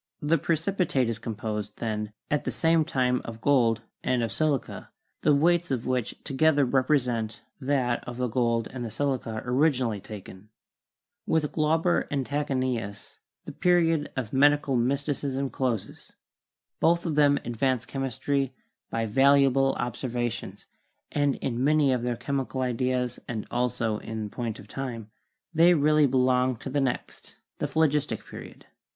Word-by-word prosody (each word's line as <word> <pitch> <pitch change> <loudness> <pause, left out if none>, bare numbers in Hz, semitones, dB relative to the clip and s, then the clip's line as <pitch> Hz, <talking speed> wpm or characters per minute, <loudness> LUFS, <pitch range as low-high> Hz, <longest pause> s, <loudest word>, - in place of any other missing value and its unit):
The 160 +3 +2
precipitate 165 -6 0
is 115 - -5
composed, 105 -2 -4
then, 105 -2 -3 0.2
at 150 - +1
the - - -2
same 165 -1 +2
time 125 -3 +1
of 115 -1 -8
gold 115 -3 +3 0.2
and 125 -2 +1
of 115 - -2
silica, 150 +3 -1 0.3
the 150 -1 +4
weights 170 +3 +3
of 130 -4 -2
which 125 -2 -1
together 145 +1 +3
represent 125 -4 0 0.2
that 130 -3 0
of 120 0 -6
the 125 0 0
gold 115 -1 +1
and 130 - -9
of - - -5
the - - -4
silica 120 -2 -2
originally 125 -4 +1
taken." 100 0 -10 0.8
With 160 -2 +1
Glauber 160 +3 +1
and 140 -2 -1
Tachenius 130 -8 -3 0.3
the - - -6
period 165 -4 +2
of 125 -6 -4
Medical 145 0 +4
Mysticism 135 +1 -1
closes. 120 -6 -3 0.7
Both 170 +1 +3
of 165 - -1
them 145 -1 +4
advanced 125 +1 0
chemistry 135 0 -2 0.3
by 115 0 -1
valuable 135 +3 +4
observations, 120 -1 -3 0.5
and 145 -2 +1
in 125 -1 -2
many 145 -2 +4
of 125 - -1
their 120 -1 -2
chemical 135 -1 -2
ideas 125 0 -1
and 110 -3 -4
also 115 -3 0
in 110 -2 -5
point 115 -3 -4
of - - -13
time, 115 -5 -6 0.4
they 170 +2 +6
really 150 0 +4
belong 130 0 +2
to 130 +4 -7
the 145 +1 +1
next, 130 -2 -4 0.2
the - - 0
Phlogistic, 150 -2 +1
Period. - - -11
130 Hz, 145 wpm, -27 LUFS, 120-145 Hz, 0.8 s, they